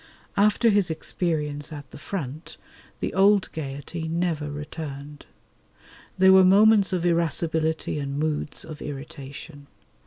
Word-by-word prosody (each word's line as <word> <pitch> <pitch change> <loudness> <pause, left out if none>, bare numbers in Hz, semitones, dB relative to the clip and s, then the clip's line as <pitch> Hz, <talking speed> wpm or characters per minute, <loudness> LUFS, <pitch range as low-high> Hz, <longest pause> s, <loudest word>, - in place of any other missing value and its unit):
After 210 +3 +4
his 200 -3 +2
experience 155 -2 -3
at 145 -3 -9
the - - -11
front 155 -3 -6 0.4
the - - -2
old 200 0 +4
gaiety 155 +2 -5
never 165 -2 -1
returned. 145 -1 -7 0.9
There 190 0 +7
were 190 0 +8
moments 205 +2 +5
of 180 -2 -1
irascibility 160 -2 0
and 140 0 -4
moods 150 -1 -2
of 155 -1 -9
irritation. 145 +1 -8
160 Hz, 120 wpm, -25 LUFS, 145-180 Hz, 0.9 s, were